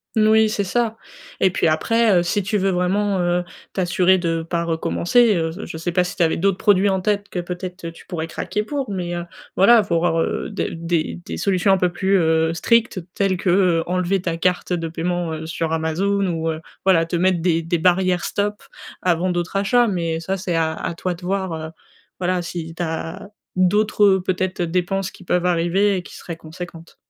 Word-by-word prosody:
Mmh, 215 -1 +4
oui, 220 0 +5
c'est 205 - -1
ça 225 +3 -1 0.4
et 190 - +3
puis 170 - +1
après, 225 +8 +2
heu, 175 - +1
si 205 +4 0
tu 205 +2 -1
veux 195 0 +1
vraiment, 190 +2 +1
heu, 175 0 +1 0.3
t'assurer 185 0 +3
de 165 -2 -1
pas 170 +1 -2
recommencer, 175 +7 +2
heu, 165 -1 -1
j 185 +6 -7
je - - -7
sais 170 +2 -3
pas 180 +1 +2
si 180 - -5
tu 175 - +2
avais 160 - +2
d'autres 195 +1 +1
produits 200 -1 +3
en 190 -1 +1
tête 205 +1 -1
que 180 - -3
peut-être, 180 0 -6
heu, 165 - -4
tu 165 - -16
pourrais 160 -3 -3
craquer 185 +5 -3
pour, 275 +2 -3
mais, 180 -3 -3
heu, 175 0 -4 0.3
voilà, 220 +3 +6
faut 170 -3 0
voir, 165 -1 +1
heu, - - -1
des 200 - -3
des 165 +1 -2
des - - -5
solutions 195 0 +2
un 195 - +5
peu 180 -1 +1
plus, 190 +2 +1
heu, 160 -1 +2
strictes 230 0 +2
telles 195 -2 +1
que, 180 - -1
heu, 175 -3 +3
enlever 185 +2 0
ta 170 -2 -2
carte 180 +1 0
de 165 -1 -2
paiement, 170 +1 -2
heu, 160 0 -5
sur 165 0 -3
Amazon 190 +5 0
ou, 165 -2 -1
heu, 160 0 -3 0.3
voilà, 165 -4 +4
te 165 - -3
mettre 180 +1 +2
des 165 -1 +2
des 170 +2 -1
barrières 180 +1 +2
stop 205 +1 -2 0.4
avant 180 0 +1
d'autres 175 +2 -2
achats. 240 +5 +3
Mais 170 -4 -1
ça, 190 +4 -2
c'est 180 -2 -2
à 160 -1 +1
à 165 - -4
toi 180 +1 -2
de 175 - -12
voir, 190 -1 -2
heu, 160 0 -5 0.5
voilà, 180 0 0
si 165 -2 -6
tu 170 - -7
as 165 +2 -4 0.3
d'autres, 205 +3 +2
heu, 190 -2 +4
peut-être, 185 0 -1
heu, 175 - 0
dépenses 185 +2 -1
qui 185 - -15
peuvent 180 0 0
arriver 180 +3 +2
et - - -3
qui - - -12
seraient 170 - -7
conséquentes. 165 +1 -10
180 Hz, 220 wpm, -21 LUFS, 170-195 Hz, 0.5 s, voilà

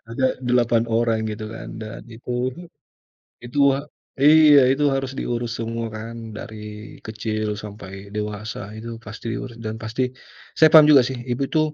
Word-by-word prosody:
Ada 130 +2 0
8 120 -2 +2
orang, 115 -1 +1
gitu 110 0 -5
kan, 115 - -8
dan, 110 0 -7
itu, 125 +2 -3 1.0
itu 120 +4 -4 0.2
a 140 - -4 0.4
iya, 150 -1 +8
itu 140 +2 +1
harus 135 -1 -2
diurus 120 -1 -2
semua 115 0 -3
kan, 115 +1 -7
dari 105 0 -9
kecil 110 -1 -3
sampai 100 -2 -9 0.2
dewasa 105 0 -4 0.2
itu 115 +1 -7
pasti 110 +1 -8
urus. 120 -3 -7
Dan 110 -1 -4
pasti 110 +4 -1 0.5
saya 160 - +7
paham 155 -2 +9
juga 135 -4 +8
sih, 130 0 -4
ibu 120 - -2
itu, 155 - +2
115 Hz, 155 wpm, -22 LUFS, 110-130 Hz, 1.0 s, paham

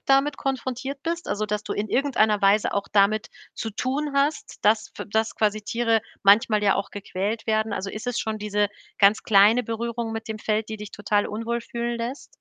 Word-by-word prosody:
damit 275 +2 +3
konfrontiert 270 +1 -3
bist? 335 +1 -3
Also, 215 +1 -1
dass 210 0 -2
du - - -3
in 210 +1 -2
irgendeiner 220 -6 +2
Weise 200 +2 +4
auch 200 - -1
damit 210 +1 +3 0.3
zu 225 - -4
tun 275 +7 -2
hast, 285 +3 0
dass 220 +1 +3
f - - -6
dass 220 +1 0
quasi 215 0 0
Tiere 230 0 +1 0.2
manchmal 210 +1 +5
ja 200 -2 +4
auch 200 - -3
gequält 205 +2 -3
werden? 220 0 +1
Also, 195 +1 -3
ist 215 +3 -7
es 245 - -1
schon 220 -1 -3
diese 210 0 0 0.3
ganz 200 +1 +5
kleine 215 +4 +5
Berührung 230 0 -3
mit 225 0 -6
dem 220 - -4
Feld, 215 0 -1
die 220 - -4
dich 210 -1 -8
total 205 0 0
unwohl 230 +2 -3
fühlen 235 0 -4
lässt? 245 +5 -6
220 Hz, 200 wpm, -24 LUFS, 210-240 Hz, 0.3 s, manchmal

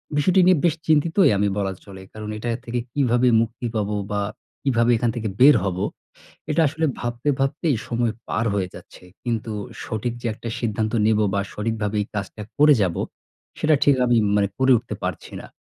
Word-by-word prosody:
বিষয়টি 180 +6 +3
নিয়ে 185 -2 +6
বেশ 170 -3 +3
চিন্তিতই 160 +5 +4
আমি 100 +1 +2
বলা 100 -1 -1
চলে। 95 -1 -11
কারণ 110 -1 -7
এটা 120 +3 -4 0.2
থেকে 120 +1 -2
কীভাবে 125 -3 +2
মুক্তি 115 +2 -3
পাব? 105 -2 0 0.2
বা 100 0 0 0.4
কীভাবে 120 -3 +2
এখান 120 +1 0
থেকে 110 -2 -2
বের 140 +3 +8
হব? 95 -2 -2 0.7
এটা 150 - +2
আসলে 155 +3 -2 0.2
ভাবতে 120 +3 -3
ভাবতেই 140 +1 0
সময় 120 -1 0 0.2
পার 115 - 0
হয়ে 95 -3 -1
যাচ্ছে। - - -13 0.2
কিন্তু 115 -2 -2 0.3
সঠিক 110 +2 -3
যে 120 - -5
একটা 115 - -7
সিদ্ধান্ত 110 -1 -1
নিব 110 -1 +3 0.2
বা 100 - +1
সঠিকভাবে 105 -1 -2
এই - - -6
কাজটা 100 +1 -5 0.2
করে 150 0 +7
যাব, 90 -3 0 0.6
সেটা 155 0 +3
ঠিক 145 - +5
আমি 120 -1 +3 0.2
মানে 100 -1 +2
করে 130 0 +4
উঠতে 120 - -7
পারছি - - -5
না। - - -10
120 Hz, 180 wpm, -23 LUFS, 105-135 Hz, 0.7 s, বের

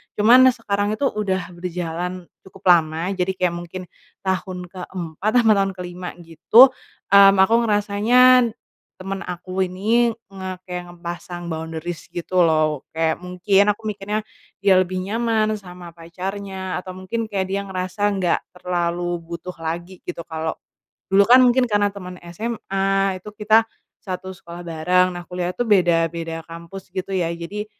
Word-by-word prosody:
Cuman 245 +5 +7
sekarang 205 -2 -1
itu 280 - -5
udah 190 -3 -2
berjalan, 175 0 -4 0.2
cukup 190 +1 -16
lama, 165 +2 +2
jadi 190 0 -1
kayak 180 -2 0
mungkin, 175 +2 -7 0.4
tahun 185 -1 -3
ke 185 -2 -8
4 180 +3 -3
apa 230 -3 +5
tahun 195 -1 +2
ke 180 - -7
5 180 0 -7
gitu, 215 - +6 0.4
mmm, 200 0 +8
aku 225 - +2
ngerasanya, 230 +4 +4 0.4
teman 195 +1 -5
aku 180 +1 -5
ini, 225 +5 +1 0.2
nge 190 -1 -6
kayak 180 -1 -6
ngepasang 175 0 -7
boundaries 160 +1 -5
gitu 180 +1 -1
loh. 155 -3 +1
Kayak 160 0 0
mungkin, 180 +2 +2
aku - - -23
mikirnya, 210 +1 -3 0.4
dia 190 -2 +6
lebih 185 0 -1
nyaman 220 +1 0
sama 180 -2 -11
pacarnya, 190 +3 -5
atau 185 0 -9
mungkin 220 +5 -4
kayak 200 -3 -1
dia 200 0 -2
ngerasa 185 +2 -2
nggak 180 -3 +1 0.2
terlalu 175 -1 -2
butuh 170 +2 -7
lagi 170 +3 -5
gitu, 170 -1 -5
kalo 160 0 -4 0.6
dulu 200 +1 +5
kan 255 +1 +8
mungkin 250 0 +4
karena 205 -2 +2
teman 180 -2 -9
SMA, 195 0 -1
itu 210 +3 -11
kita 220 +1 +3 0.3
satu 185 -1 -6
sekolah 175 -1 -10
bareng. 180 +2 +2
Nah 175 -1 -8
kuliah 180 0 -3
tuh 245 - 0
beda 175 -5 +4
beda 165 0 -6
kampus 170 +3 -10
gitu 185 +1 -4
ya, 175 -3 0
jadi, 200 +5 -6
185 Hz, 150 wpm, -22 LUFS, 175-200 Hz, 0.6 s, mmm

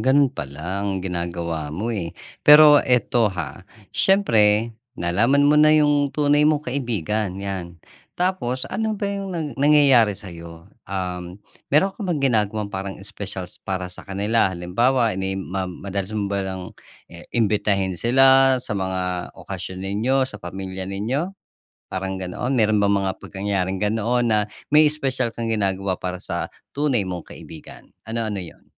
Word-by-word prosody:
gano'n 135 0 +3
pala 80 - -5
ang 95 -2 -2
ginagawa 85 -3 -3
mo 100 +11 -3
eh. 85 -5 -4 0.2
Pero 150 0 +8
ito 120 -3 +2
ha, 90 -4 -5 0.3
siyempre 115 - +3 0.2
nalaman 115 +12 +2
mo 145 - +5
na 155 - +6
'yong 145 -2 +4
tunay 150 0 +4
mong 150 -1 +1
kaibigan 110 - -2
'yan, 95 -3 -5 0.4
tapos 175 -9 -1
ano 220 -1 -1
ba 200 - -4
'yong 200 -1 -3
nang 160 -2 -2
nangyayari 140 -8 +5
sa'yo? 85 -4 -10 0.2
Um, 90 -1 -4 0.3
meron 175 +7 +3
ka - - -19
bang 160 -5 0
ginagawang 105 -4 0
parang 95 0 -4
espesyal 95 -1 -7 0.2
para 95 -1 -3
sa - - -10
kanila? 100 +2 +1
Halimbawa 115 +7 +1
ini 95 +1 -2
ma 95 0 -3
madalas 95 +1 -4
mo 105 - 0
bang 95 -2 -3 0.4
i 85 - -10 0.2
imbitahin 100 -3 +1
sila 135 +2 +5
sa 115 - -4
mga 95 -2 -2
okasyon 95 - -7
ninyo, 120 +7 +1
sa 105 -5 -9
pamilya 95 +1 -6
ninyo, 115 - -2 0.6
parang 95 0 -4
ganoon? 95 +8 -3
Meron 110 -4 +3
bang 100 -1 +3
mga 95 -1 0
pagyayaring 95 -1 -3
ganoon 115 +3 +1
na 110 -1 +3 0.3
may 150 +1 +6
espesyal 135 -5 0
kang 115 0 -4
ginagawa 95 -3 -1
para 90 0 -5
sa - - -4 0.2
tunay 140 -5 +1
mong 90 -2 -6
kaibigan, 80 - -12 0.2
ano-ano 110 -3 -3
'yon? 80 - -14
105 Hz, 145 wpm, -22 LUFS, 95-130 Hz, 0.6 s, Pero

